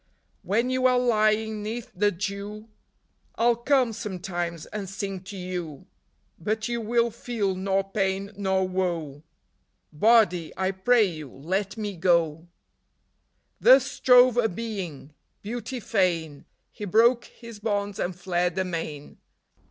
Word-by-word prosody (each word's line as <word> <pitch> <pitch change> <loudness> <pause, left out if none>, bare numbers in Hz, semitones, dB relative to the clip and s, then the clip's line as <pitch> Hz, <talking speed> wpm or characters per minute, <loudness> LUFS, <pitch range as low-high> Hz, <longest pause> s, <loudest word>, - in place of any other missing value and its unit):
When 235 +5 0
you 255 0 +3
are 250 -1 +3
lying 220 -2 +2
'neath 225 +3 -5
the 205 +3 +2
dew 205 +3 -5 0.7
I - - -2
'll 240 - +4
come, 250 0 +2
sometimes, 175 -5 -4
and 200 -3 -6
sing 195 0 -4
to 200 0 -8
you; 180 -5 -5 0.5
But 215 +5 -2
you 235 -1 -2
will 235 +1 +1
feel 220 -4 -2
nor 195 +1 0
pain 195 0 -2
nor 190 -2 0
woe; 170 -6 -2 0.7
Body, 180 -2 +3
I 190 +1 +1
pray 220 +5 +3
you, 155 -7 -4
let 190 - -3
me 205 -2 -4
go! 170 -2 +1 0.5
" - - -46
Thus 265 0 +7
strove 250 -2 +5
a 230 -2 +3
Being: 180 -9 -6 0.3
Beauty 240 +4 -5
fain, 170 -9 -1 0.3
He 210 - -7
broke 230 +5 +4
his 230 -3 -12
bonds 205 -1 -2
and 180 0 -2
fled 180 0 -1
amain. 165 -6 -4
200 Hz, 135 wpm, -26 LUFS, 180-225 Hz, 0.7 s, Thus